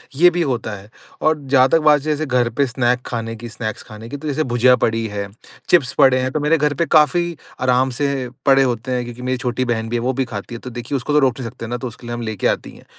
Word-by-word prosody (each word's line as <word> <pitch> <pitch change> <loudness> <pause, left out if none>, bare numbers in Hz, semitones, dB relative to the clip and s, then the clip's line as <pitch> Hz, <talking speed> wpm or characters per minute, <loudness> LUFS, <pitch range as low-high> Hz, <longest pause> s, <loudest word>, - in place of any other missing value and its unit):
ये 175 +5 +6
भी 175 0 -1
होता 125 -8 -1
है। 100 +1 -13 0.3
और 155 0 +2
जहाँ 130 -1 +6
तक 165 - +4
बात 150 -1 +6
जैसे 155 +1 -1
घर 125 -3 +1
पे 140 +5 +1
स्नैक 125 -1 0
खाने 115 -1 -4
की, 120 +1 -8
स्नैक्स 110 -1 -5
खाने 110 +1 -11
की 145 - -5
तो 155 +2 -7
जैसे 150 +1 0
भुजिया 125 0 +4
पड़ी 115 0 +1
है, 100 -1 -4 0.4
चिप्स 160 -8 +3
पड़े 130 -3 +5
हैं 130 0 -1
तो 155 - -1
मेरे 150 +2 +2
घर 150 -1 +1
पे 170 +4 0
काफ़ी 170 +2 +3 0.3
आराम 130 +1 +3
से 140 -3 -1 0.2
पड़े 135 -1 +5
होते 125 0 -2
हैं 125 -1 0
क्योंकि 120 +1 -9
मेरी 130 +1 -1
छोटी 125 0 -2
बहन 115 -2 -2
भी 120 - -2
है - - +1
वो 130 +2 0
भी 135 +1 -1
खाती 110 0 -7
है। - - -7
तो 125 - -7
देखिए 120 +3 -5
उसको 140 +3 -2
तो 150 - +5
रोक 130 -3 +1
नहीं 120 -3 -4
सकते 115 - -8
न 120 +2 -3
तो 125 - -5
उसके 120 +1 -11
लिए 120 - -4
हम 120 - -4
ले 110 -2 -4
के - - 0
आते - - -1
ही - - -14
हैं। - - -18
125 Hz, 285 wpm, -19 LUFS, 120-145 Hz, 0.4 s, ये